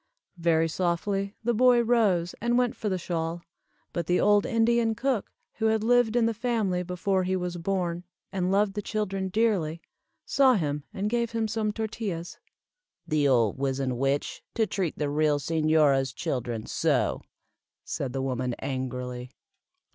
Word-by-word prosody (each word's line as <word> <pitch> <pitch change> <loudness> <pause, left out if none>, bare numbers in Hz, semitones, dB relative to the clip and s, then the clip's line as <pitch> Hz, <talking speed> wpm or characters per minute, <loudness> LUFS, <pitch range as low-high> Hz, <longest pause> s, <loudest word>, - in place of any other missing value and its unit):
Very 165 -1 +3
softly 195 +4 -1
the 240 +1 +1
boy 245 +1 +5
rose 205 -8 +2
and 240 +1 +2
went 250 -1 +1
for 210 - -3
the 185 - 0
shawl, 170 -1 -3 0.5
but 170 -2 -2
the 180 - +2
old 205 0 +4
Indian 230 -1 +2
cook, 250 -1 -1 0.3
who 220 - +1
had 220 -1 +1
lived 240 -1 +3
in 240 -2 +4
the 230 - +1
family 215 -6 0
before 185 +1 0
he 185 +1 0
was 180 -1 -3
born, 175 -1 -2 0.3
and 185 -1 -1
loved 200 0 +2
the 210 - -3
children 195 -3 -2
dearly, 185 -7 +1 0.5
saw 265 -2 +4
him 150 -5 -2
and 200 +1 -2
gave 235 +1 -1
him 225 -1 0
some 215 -1 -1
tortillas. 210 -6 -4 0.7
"The 150 -2 +2
old 120 -3 +2
wizzen 135 -2 -1
witch, 135 +1 -1
to 225 - +3
treat 185 -4 -2
the 150 - -1
real 150 0 +2
señora's 150 -3 +2
children 120 -4 -3
so!" - - 0 0.6
said 135 -3 -3
the 135 0 -2
woman, 125 -2 -2
angrily. 125 -2 -4
185 Hz, 155 wpm, -27 LUFS, 150-220 Hz, 0.7 s, boy